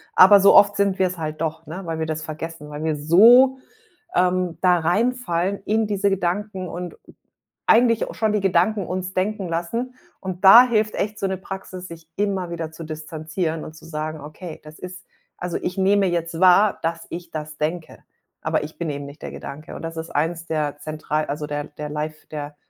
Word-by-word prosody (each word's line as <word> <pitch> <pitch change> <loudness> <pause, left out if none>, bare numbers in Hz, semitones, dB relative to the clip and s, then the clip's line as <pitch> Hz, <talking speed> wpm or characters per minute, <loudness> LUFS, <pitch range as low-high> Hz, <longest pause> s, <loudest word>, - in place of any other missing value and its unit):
aber 200 +2 +8
so 200 - +7
oft 205 0 +7
sind 200 -1 +1
wir's 185 -1 +1
halt 155 -1 -5
doch, 160 0 -3
ne, 165 +5 -7
weil 165 -1 -3
wir 160 - -1
das 155 0 -4
vergessen, 155 0 -7
weil 150 +1 -6
wir 155 -2 0
so, 235 - +6 0.6
ähm, 180 -2 +1
da 180 -1 +4
reinfallen 195 0 0
in 215 +1 +1
diese 200 -1 +1
Gedanken 190 +1 -2
und, 175 +1 -7 0.7
eigentlich 230 0 +4
au - - -7
schon 220 -1 0
die 210 - +2
Gedanken 195 +2 +2
uns 185 0 -4
denken 195 0 -1
lassen. 230 +10 -3 0.3
Und 185 -1 -6
da 230 +6 +11
hilft 215 -3 +1
echt 210 +1 -2
so 195 - 0
'ne 190 -1 -2
Praxis, 185 -1 -8
sich 165 -1 -12
immer 195 -3 -1
wieder 165 -2 -5
zu 160 +1 -9
distanzieren 155 +1 -4
und 155 - -10
zu 160 - -15
sagen: 155 -1 -5
„Okay, 155 +3 -9
das 155 +1 -13
ist 185 +1 -9 0.3
also, 180 -1 -3
ich 180 - -3
nehme 195 +1 +3
jetzt 170 -1 -2
wahr, 190 +3 +5
dass 165 0 -2
ich 170 0 -7
das 155 -1 -6
denke, 160 +2 -3 0.4
aber - - 0
ich 155 +1 -9
bin 170 -2 -2
eben 140 -1 -4
nicht 140 +1 -12
der - - -5
Gedanke.“ 155 +3 -9
Und - - -8
das 165 0 -6
ist 160 +1 -5
1 165 +3 -1
der 150 -2 -2
zentral 155 0 -3
also 150 +1 -4
der 145 0 -3
der 150 0 -8
life 155 +1 -5
der 145 -1 -6
170 Hz, 200 wpm, -22 LUFS, 155-195 Hz, 0.7 s, da